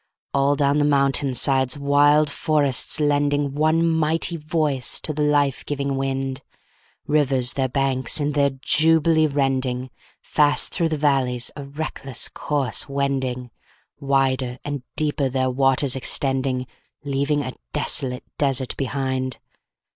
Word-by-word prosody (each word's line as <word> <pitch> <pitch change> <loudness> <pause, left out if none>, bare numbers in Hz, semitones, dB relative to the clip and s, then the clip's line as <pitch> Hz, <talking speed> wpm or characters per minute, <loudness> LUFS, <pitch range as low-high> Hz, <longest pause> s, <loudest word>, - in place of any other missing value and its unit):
All 140 +1 +2
down 140 0 +2
the - - +2
mountain 140 -2 +2
sides 130 +2 +2
wild 145 +2 +4
forests 145 -4 +1
lending 145 -1 +1
One 155 +3 +2
mighty 160 +1 +1
voice 150 -4 -1
to 155 - -1
the 150 - -3
life 145 -2 +1
giving 140 -1 -2
wind, 135 0 -3 0.6
Rivers 135 -4 +1
their 135 -1 -1
banks 135 +1 0
in 145 0 0
their 140 -1 +2
jubilee 160 +3 +2
rending, 130 -3 -1 0.3
Fast 150 -1 +1
through 170 -3 +1
the 155 - -2
valleys 130 -4 +1
a 140 - -7
reckless 140 -3 -4
course 140 -5 -1
wending, 130 -3 -2 0.5
Wider 135 -2 0
and 145 -2 -4
deeper 145 -3 0
their 130 0 0
waters 135 0 +2
extending, 130 -1 0 0.4
Leaving 145 +1 0
a 130 - -5 0.2
desolate 125 - -1 0.2
desert 135 -3 0
behind. 130 -1 -2
140 Hz, 125 wpm, -22 LUFS, 130-145 Hz, 0.6 s, wild